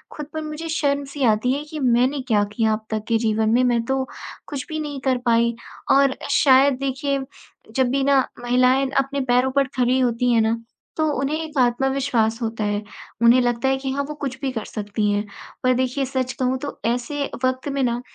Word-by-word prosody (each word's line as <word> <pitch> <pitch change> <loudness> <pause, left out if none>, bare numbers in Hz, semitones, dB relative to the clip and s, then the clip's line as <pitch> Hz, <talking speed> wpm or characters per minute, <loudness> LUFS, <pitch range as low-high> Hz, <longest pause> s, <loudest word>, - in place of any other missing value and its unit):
खुद 300 - -5
पर 315 - -3
मुझे 305 +2 -6
शर्म-सी 280 -2 -1
आती 220 +4 +2
है 290 +2 -3
कि 310 - -5
मैंने 255 +2 +2
क्या 210 -3 +3
किया 220 -1 +2
अब 215 0 -4
तक 215 -1 -2
के 230 -1 +2
जीवन 220 -1 +1
में? 245 +3 +3
मैं 240 -2 +2
तो 265 +1 0 0.4
कुछ 280 -4 -5
भी 310 -1 -3
नहीं 290 -3 -4
कर 255 -1 +3
पाई 235 0 +3 0.4
और 275 -1 +4
शायद 270 -1 +5
देखिए 275 +1 -1 0.6
जब 260 -2 +2
भी 275 0 +1
ना 275 -1 +3 0.2
महिलाएँ 255 +2 +3
अपने 275 +1 0
पैरों 250 +2 +3
पर 275 0 +2
खड़ी 250 +1 +2
होती 245 0 +1
है 225 - +4
ना 225 +1 +1 0.4
तो 315 - +2
उन्हें 285 +3 0
एक 310 -2 -7
आत्मविश्वास 250 -2 +1
होता 225 -1 -2
है, 205 0 -1 0.4
उन्हें 240 +2 +6
लगता 240 +2 0
है 265 - +2
कि 265 0 -4
हाँ, 280 +1 -1
वो 300 - -6
कुछ 270 -3 -5
भी 270 - -1
कर 225 -4 -4
सकती 210 0 -2
हैं, 205 +1 0 0.4
पर 255 0 +4
देखिए 260 +2 0
सच 260 -1 -2
कहूँ 255 0 +1
तो 285 - -6
ऐसे 245 +5 -1 0.2
वक़्त 255 +2 0
में 275 - -1
ना 240 0 0
255 Hz, 205 wpm, -22 LUFS, 235-275 Hz, 0.6 s, उन्हें